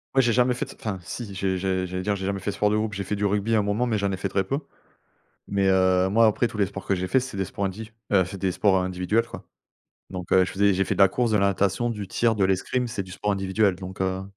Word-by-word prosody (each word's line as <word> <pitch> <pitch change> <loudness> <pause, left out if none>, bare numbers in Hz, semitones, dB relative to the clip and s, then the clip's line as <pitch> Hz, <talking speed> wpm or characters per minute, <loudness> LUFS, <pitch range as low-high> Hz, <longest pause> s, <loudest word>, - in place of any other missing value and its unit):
Ouais, 135 - +5
j'ai 120 -1 +2
jamais 125 0 +3
fait - - -3
d - - -12
enfin, 100 -4 -3
si, 100 +2 -7
j'ai 95 -1 -1
j'ai 95 -1 -1
j'allais 90 0 -4
dire: 100 +1 0
«J'ai 95 - -5
jamais 100 0 -1
fait 95 - -4
de 100 - -3
sport 105 0 +2
de - - +2
groupe». 110 -1 -1
J'ai 100 - -3
fait 105 +2 -3
du 100 0 -1
rugby 105 +3 0
à 110 - +4
un - - +3
moment 105 +4 0
mais 110 -3 0
j'en 100 0 0
ai 95 - -2
fait 100 +1 -2
très 95 0 0
peu, 135 +9 -2 0.9
mais 100 -1 +1
heu, 95 0 +3
moi, 115 +3 +4
après 110 +3 +2
tous 105 - -9
les 100 - +3
sports 95 0 -8
que 95 - +2
j'ai 90 +1 -3
fait 130 - +3
c'est 125 -5 -6
des 95 - 0
sports 100 -3 -3
indiv 110 +4 -6 0.2
heu, 95 -3 +4
c'est 95 +1 -8
des 95 -1 0
sports 95 0 +2
individuels, 95 +5 0
quoi, 115 - -10 0.6
donc 90 -2 -6
heu, 95 -1 +5
je - - -5
faisais 100 +1 +3
j'ai 95 +1 +1
fait - - 0
de - - -4
la 95 - +7
course, 120 +3 0
de - - +4
la 100 0 +3
natation, 100 +5 0
du 105 -4 -5
tir, 115 +4 +1
de 100 - +2
l'escrime, 100 +7 0
c'est 110 -4 -4
du 95 - -13
sport 105 +2 -1
individuel, 95 +1 +1
donc 95 +1 -9
heu 95 0 -1
100 Hz, 305 wpm, -25 LUFS, 95-110 Hz, 0.9 s, la